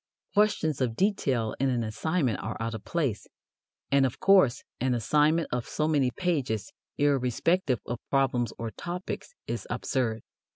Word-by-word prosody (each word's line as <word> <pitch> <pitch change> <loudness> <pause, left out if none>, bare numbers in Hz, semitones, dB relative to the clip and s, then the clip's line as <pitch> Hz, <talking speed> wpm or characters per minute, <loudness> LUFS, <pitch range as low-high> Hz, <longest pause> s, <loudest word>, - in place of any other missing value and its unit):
Questions 200 -9 +2
of 120 -3 0
detail 135 - +1
in 135 +1 +2
an 120 -2 0
assignment 125 - 0
are 110 +2 -4
out 115 +1 -2
of 110 - -6
place, 140 -11 -1 0.6
and, 140 -1 +5
of 130 -2 -1
course, 190 -11 +5 0.2
an 125 0 +1
assignment 150 +8 +2
of 125 -1 -2
so 155 - -1
many 145 -5 +3
pages, 125 - -1 0.3
irrespective 140 +2 +2
of 120 -1 -4
problems 125 -4 +1
or 115 -1 -4
topics, 180 - -6
is - - -4
absurd. 115 -5 -1
130 Hz, 150 wpm, -28 LUFS, 115-160 Hz, 0.6 s, and